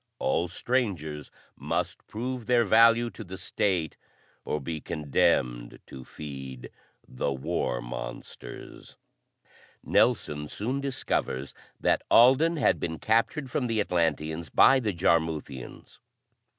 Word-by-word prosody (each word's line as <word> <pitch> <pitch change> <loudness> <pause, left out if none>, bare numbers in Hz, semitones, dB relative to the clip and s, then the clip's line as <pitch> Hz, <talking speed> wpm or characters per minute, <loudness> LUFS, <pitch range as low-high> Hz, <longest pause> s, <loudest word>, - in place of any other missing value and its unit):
All 85 +6 0
strangers 90 - -2 0.3
must - - -3
prove 120 +1 -5
their 120 -1 +4
value 115 +3 +5
to 110 - -9
the 95 -1 -8
State 90 -4 -1 0.5
or 75 - -2
be 80 +2 -5
condemned 65 -6 0
to 65 - -10
feed 65 -3 -8 0.4
the 65 +2 -2
war 65 -3 -2
monsters. - - -9 0.9
Nelson 75 0 +1
soon 125 - -3
discovers 70 - -2 0.3
that - - +2
Alden 135 +8 +6
had 145 - +2
been 80 -1 -3
captured 120 - 0
from 125 -1 0
the 115 -2 0
Atlanteans 80 -4 -1
by 135 0 +6
the 110 -5 -1
Jarmuthians. 80 -7 -2
85 Hz, 110 wpm, -27 LUFS, 75-115 Hz, 0.9 s, Alden